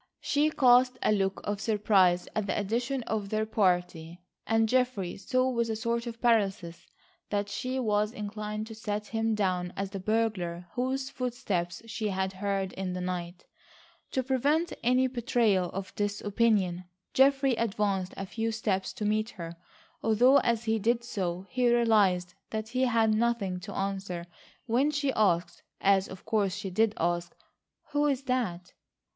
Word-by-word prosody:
She 295 +2 +2
cast 255 -3 +4
a - - +3
look 195 -2 0
of 205 0 -3
surprise 195 -5 +3
at 215 -2 -1
the - - -1
addition 240 +6 -1
to 220 - 0
their 215 +2 -2
party 180 -5 0 0.3
and 225 0 +3
Geoffrey 250 -7 0
saw 255 +5 0
with 235 -2 0
a 220 - -1
sort 235 +2 -2
of 230 -1 -6
paralysis 195 -8 +1 0.4
that 205 0 -1
she 255 +5 -3
was 210 -3 +1
inclined 210 -1 -5
to 225 - -9
set 210 -1 -4
him 225 +1 0
down 180 -3 0
as 195 0 -3
the 195 - -5
burglar 190 -5 -1
whose 260 +2 -2
footsteps 220 -9 -3
she 220 -1 -3
had 190 -1 -1
heard 195 -1 -2
in 185 -1 -3
the 180 - -3
night. 180 -1 -4 0.7
To 260 - +1
prevent 285 +6 +1
any 255 +2 +3
betrayal 235 -7 +1
of 195 0 -6
this 205 0 -1
opinion, 205 -4 +1 0.3
Geoffrey 270 0 +4
advanced 200 -4 -1
a 195 - -4
few 225 +3 -2
steps 205 -4 -1
to 210 - -4
meet 215 +2 +1
her, 170 -5 -8 0.5
although 240 +5 +5
as 235 -1 0
he 220 -1 +1
did 235 +3 +1
so, 185 -5 -3
he 250 0 +2
realised 205 -7 +3 0.2
that 220 0 -4
he 255 +2 +1
had 225 -3 +3
nothing 215 -5 0
to 195 +2 -8
answer 195 -3 -3 0.4
when 250 +5 +2
she 285 -2 0
asked, 175 -5 +1 0.2
as 195 -1 +3
of 190 - -10
course 205 -4 +1
she 200 -2 -5
did 215 +3 +2
ask: 175 +1 -1 0.6
"Who 295 0 +2
is 275 -2 0
that?" 215 -9 -2
215 Hz, 165 wpm, -29 LUFS, 190-235 Hz, 0.7 s, although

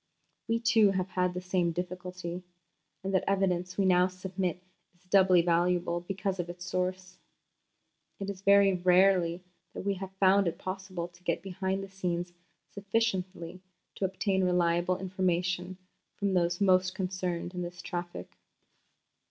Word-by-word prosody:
We, 230 0 +1
too, 225 -3 +4
have 190 -1 -1
had 180 -1 0
the 180 - -3
same 180 -2 0
difficulty, 180 0 -5 0.6
and 195 0 -3
the 190 - +1
evidence 180 -2 0
we 195 - +2
now 180 -1 +5
submit 185 -1 -4 0.3
is 175 - -31
doubly 185 -2 +5
valuable 175 0 +1
because 190 +1 -3
of 175 -1 -3
its 175 0 -8
source. 185 0 -3 1.0
It 195 - -4
is 200 -2 -5
very 200 0 +5
rarely 180 -1 +3 0.3
that - - -6
we 200 - +2
have 195 0 -6
found 195 0 +4
it 165 - -2
possible 185 -2 -5
to 175 0 -22
get 170 0 -1
behind 190 0 -2
the - - -7
scenes 175 -2 -3 0.4
sufficiently 190 -4 -2 0.3
to 195 - -2
obtain 190 0 0
reliable 175 0 +2
information 180 -1 -1 0.4
from 200 -2 -1
those 175 -1 +1
most 185 -2 +3
concerned 180 -2 -3
in 180 - -4
this 175 0 -6
traffic. 175 - -6
185 Hz, 145 wpm, -30 LUFS, 175-190 Hz, 1.0 s, now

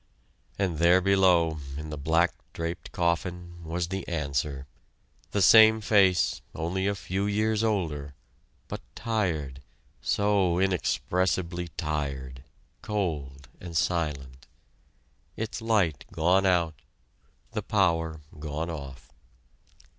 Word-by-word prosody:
And 90 -6 -1
there 85 +2 +6
below, 90 -4 +3 0.2
in 75 0 -6
the - - -3
black 80 +4 +2 0.2
draped 85 +1 -5
coffin, 85 0 -2
was 85 +1 -3
the 95 0 -4
answer 70 -3 -2 0.6
the 100 - +1
same 110 +1 +8
face, 100 -4 +3
only 90 +4 -1
a 100 - 0
few 95 +2 -2
years 110 +1 +1
older, 80 -10 -1 0.5
but - - -6
tired, 80 - -2 0.4
so 100 -4 +2
inexpressibly 90 -1 0
tired, 70 -5 -3 0.4
cold 75 - -3
and 85 -2 -5
silent; 70 -7 -2 0.9
its 110 +1 -4
light 105 -10 +1
gone 95 +4 +3
out 85 -4 +1 0.7
the - - -2
power 80 -6 +1 0.2
gone 80 +2 -3
off. 70 -4 -9
85 Hz, 105 wpm, -27 LUFS, 75-95 Hz, 0.9 s, same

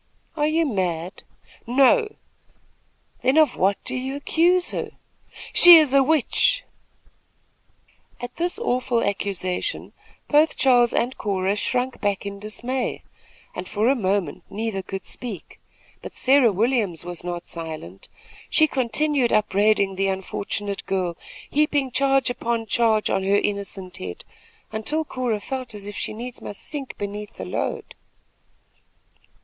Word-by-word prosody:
"Are 295 -1 +1
you 325 +1 +2
mad?" 180 - -2 0.5
"No." 275 - +3 1.1
"Then 260 +4 +2
of 310 -2 +4
what 195 +2 +2
do 255 - -4
you 260 +2 -3
accuse 345 +5 +2
her?" - - -4 0.6
"She 350 -1 +11
is 300 -4 +4
a 275 - +6
witch." 315 - +2 1.6
At 245 0 -8
this 350 +3 -1
awful 250 - 0
accusation 200 - -2 0.3
both 305 +2 +3
Charles 245 -3 +4
and 245 +2 0
Cora 195 -1 0
shrunk 250 +4 -2
back 205 -1 -1
in 200 0 -6
dismay, 240 +5 -3 0.5
and 180 - -6
for 215 +3 0
a 275 - +3
moment 185 - -1
neither 210 -1 -3
could 190 0 -6
speak; 225 -9 -7 0.4
but - - -9
Sarah 265 -3 +4
Williams 205 -5 0
was 175 -2 -6
not 175 0 -5
silent. 155 - -8 0.4
She 315 - +5
continued 275 -1 +1
upbraiding 205 -2 +2
the 195 0 +1
unfortunate 200 +1 -3
girl, 185 -3 -1 0.3
heaping 290 -3 +1
charge 270 -1 +2
upon 235 -1 -2
charge 220 -1 +2
on - - +1
her 195 +1 +2
innocent 200 -3 -3
head, 90 -1 -7 0.5
until 295 +9 -1
Cora 245 -6 -2
felt 255 0 -6
as 205 -1 -8
if 205 0 -7
she - - -3
needs 240 +3 -8
must 205 - -8
sink 285 -3 -5
beneath 205 +1 -6
the - - -7
load. - - -4
225 Hz, 135 wpm, -23 LUFS, 195-270 Hz, 1.6 s, She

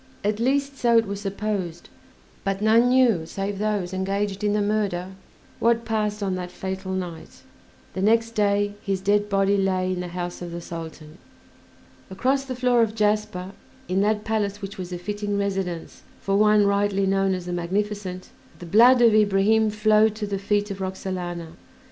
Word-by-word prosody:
At 210 +1 0
least 275 +3 0
so 235 -1 +4
it 225 - +4
was 200 0 -5
supposed, 195 -4 -3 0.6
but 195 -1 -1
none 225 +3 +4
knew 240 -10 +3
save 195 +2 -4
those 205 -4 -1
engaged 195 +1 -2
in 205 -1 +2
the 210 - +1
murder 200 -4 -1 0.5
what 230 0 +2
passed 210 -2 -1
on 190 -1 -1
that 180 -1 -4
fatal 190 +1 -5
night; 180 -3 -6 0.5
the 190 - -3
next 225 +3 +3
day 205 -2 +1
his 195 -1 -2
dead 205 +2 +1
body 195 0 +2
lay 185 -1 0
in 180 - -4
the 180 - -4
house 175 0 -5
of 175 -1 -6
the 170 - -5
Sultan. 165 -1 -9 0.9
Across 265 +8 0
the 260 -1 -5
floor 250 -1 +3
of 220 -1 0
jasper, 210 -3 0 0.4
in 185 +2 +1
that 210 +1 +1
palace 210 -2 -1
which 200 -1 -7
was 180 -1 -6
a 180 - -3
fitting 205 +2 -3
residence 190 -4 -3 0.2
for 195 - -1
one 210 0 +5
rightly 200 -1 +1
known 195 0 +1
as 180 -1 -6
"The 180 - -4
Magnificent," 185 +1 -3 0.3
the 175 - -10
blood 240 +7 +6
of 230 -2 +6
Ibrahim 215 +1 +3
flowed 215 0 +3
to 215 -1 -3
the 200 -1 -3
feet 205 +1 0
of 195 0 -6
Roxalana. 180 -3 -4
200 Hz, 175 wpm, -24 LUFS, 185-215 Hz, 0.9 s, blood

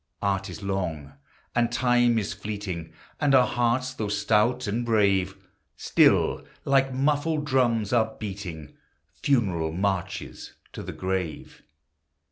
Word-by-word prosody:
Art 95 0 0
is 90 -1 -8
long, 85 -7 -3 0.4
and 120 0 +1
Time 120 -1 +3
is 105 -2 -1
fleeting, 100 -6 -5 0.3
And 140 -2 +3
our 125 -1 +6
hearts, 120 +2 0
though 110 -5 -3
stout 105 +4 +1
and 110 +3 -1
brave, 100 -4 +2 0.4
Still, - - +3 0.2
like 135 -1 +3
muffled 150 +3 0
drums, 120 -6 +1
are 110 -2 +2
beating 95 -8 -7 0.5
Funeral 95 - +1
marches 95 0 -3 0.2
to - - -6
the - - -6
grave. 95 -4 -4
105 Hz, 120 wpm, -26 LUFS, 95-125 Hz, 0.5 s, our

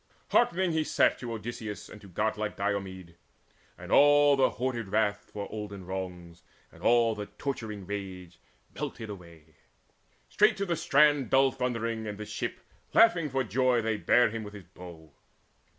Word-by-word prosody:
Hearkening 190 -7 +2
he 160 -1 +1
sat - - +2
To 120 -2 -6
Odysseus 105 -2 -6
and 105 - -12
to 100 - -13
godlike 105 +3 -2
Diomede; 95 -4 -4 0.6
And - - -10
all 145 0 +6
the 135 -1 +3
hoarded 120 -2 -3
wrath 105 0 0
for 100 -1 -5
olden 100 -3 -7
wrongs 90 -2 -7 0.3
And - - -17
all 120 -1 +4
the 105 -1 -6
torturing 110 -8 -5
rage, 90 -3 -7 0.3
melted 110 -2 -6
away. 85 -5 -13 0.7
Straight - - +3
to 200 - -1
the 175 -3 -1
strand 145 -3 +3
dull 135 0 +4
thundering 115 -3 -3
and 105 -1 -5
the 105 - -6
ship, - - -5 0.3
Laughing 215 -9 +5
for 135 0 0
joy, 125 +3 +2
they 110 -1 0
bare 120 +2 +3
him 115 -1 -5
with 105 0 -9
his 100 -3 -11
bow. 80 -4 -13
110 Hz, 160 wpm, -29 LUFS, 95-130 Hz, 0.7 s, all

